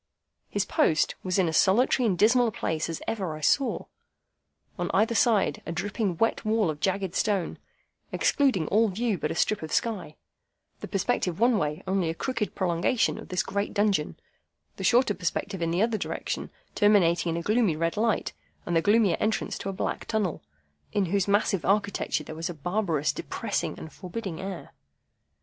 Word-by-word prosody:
His 205 0 -1
post 155 -4 +2
was 185 0 -1
in 185 -3 +3
as 160 - +1
solitary 240 +5 +3
and 190 -4 +1
dismal 240 +5 +4
a - - -1
place 160 -5 -2
as 165 - -5
ever 185 -8 -2
I - - -11
saw. 270 - +1 0.9
On - - -1
either 225 +2 +3
side, 220 -3 +2
a - - -2
dripping 200 +1 -2
wet 225 - +1
wall 215 -5 +2
of 150 - -8
jagged 190 0 -1
stone, 200 -5 0 0.5
excluding 250 - +2
all 225 +3 +4
view 215 0 -1
but - - -1
a - - -3
strip 215 - +1
of 160 - -6
sky; 200 -10 -1 0.6
the - - -7
perspective 195 -3 -1
one 235 -2 +4
way 150 -1 -2
only 190 -3 0
a 165 - -3
crooked 235 0 -3
prolongation 185 +6 +1
of - - -11
this 180 -1 0
great 200 +1 -3
dungeon; 200 -7 +1 0.6
the - - -5
shorter 245 -2 +4
perspective 190 +1 -3
in 165 - 0
the 175 +5 +2
other 225 -2 0
direction - - -4 0.2
terminating 180 -5 +3
in 165 - -1
a 170 - -3
gloomy 215 -5 +2
red 165 +1 -1
light, 220 +1 0 0.3
and 175 - -1
the 165 - +4
gloomier 205 0 +3
entrance 215 +1 -1
to 195 - -4
a - - -1
black 190 - -3
tunnel, 215 -7 -1 0.5
in 200 -2 +2
whose 195 +2 0
massive 200 -3 +2
architecture 200 -5 0
there 155 - -8
was 165 +2 -4
a 175 - -6
barbarous, 165 -3 0
depressing, - - -3
and 160 - -9
forbidding 185 -2 -6
air. 190 -2 -6
195 Hz, 180 wpm, -27 LUFS, 170-215 Hz, 0.9 s, dismal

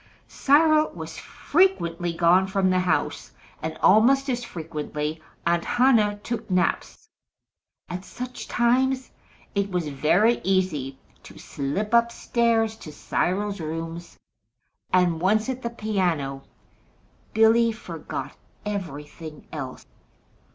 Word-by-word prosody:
Cyril 310 +2 +4
was 160 -1 -7
frequently 175 - +1
gone 175 +3 +4
from 190 -1 +1
the 185 - +2
house, 180 0 -1 0.3
and - - -4
almost 270 +6 +5
as 245 -1 -2
frequently 155 -4 -5 0.2
Aunt 170 0 +2
Hannah 230 -5 +3
took 235 -2 -4
naps. 180 -2 -1 0.8
At 180 +1 -6
such 250 +4 -7
times 255 +2 +1 0.4
it 200 -1 0
was 180 -5 -2
very 205 - +2
easy 170 -9 0 0.2
to - - -14
slip 190 +11 -3
up 235 0 +4
stairs 230 -2 +1
to 155 - -10
Cyril's 195 +6 -1
rooms, 165 +1 -6 0.7
and 175 -3 +2
once 215 +6 +2
at 260 0 -3
the 235 - -2
piano, 180 -12 -1 0.9
Billy 225 +1 +5
forgot 220 - -7 0.3
everything 160 -5 -6
else. 135 -4 -7
190 Hz, 110 wpm, -25 LUFS, 165-235 Hz, 0.9 s, almost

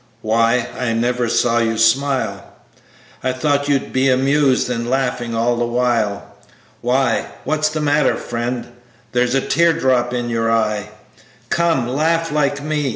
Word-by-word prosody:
Why, 115 +2 +2
I 125 -2 -1
never 120 +1 0
see 120 0 +2
you 115 0 -1
smile, 130 +4 +1 0.8
I 130 -1 0
thought 145 +2 0
you'd 140 -1 0
be 130 +1 +2
amused, 135 +1 +2
and 120 -1 -3
laughing 125 -3 -1
all 120 +1 +1
the 120 0 0
while. 120 -4 0 0.6
Why, 125 -1 +1 0.2
what's 155 0 0
the 155 0 -3
matter, 145 -1 +2
friend? 120 +1 -4 0.4
There's 125 +1 +1
a 135 - +2
tear 170 +5 +2
drop 130 -6 +1
in 120 -1 -2
you 115 -1 0
eye, 105 -2 0 0.6
Come, 165 -8 +1
laugh 165 +5 0
like 145 -1 0
me. 150 -2 -1
125 Hz, 150 wpm, -19 LUFS, 120-145 Hz, 0.8 s, Why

